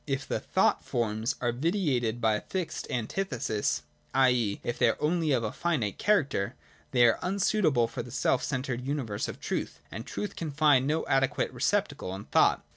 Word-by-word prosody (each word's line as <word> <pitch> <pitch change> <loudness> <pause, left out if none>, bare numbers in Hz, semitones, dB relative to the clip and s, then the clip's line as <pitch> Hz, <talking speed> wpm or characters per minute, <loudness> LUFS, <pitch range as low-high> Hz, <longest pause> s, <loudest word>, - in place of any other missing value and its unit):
If 135 0 -2
the - - -1
thought - - +1
forms 110 -1 -1
are 120 -1 +1
vitiated 130 - 0
by 110 -2 +3
a 105 - -1
fixed 175 -4 -4
antithesis, 115 - -1 0.3
i.e. 125 -6 +3
if 120 - -3
they - - +5
are - - -1
only 160 +1 +1
of 125 -4 +2
a 110 - -2
finite 145 - -1
character, 145 - +1 0.3
they 120 -2 +5
are 115 - +4
unsuitable 180 - +2
for 120 +2 -5
the 120 - -9
self 130 +1 +1
centred 130 -2 -2
universe 130 -7 -2
of - - -7
truth, - - -3
and 110 +4 -6
truth 205 - -5
can 165 - -4
find 140 -2 +4
no 155 +2 0
adequate 135 -1 +1
receptacle 95 - -1
in 100 - -8
thought. - - +3
130 Hz, 180 wpm, -29 LUFS, 115-155 Hz, 0.3 s, they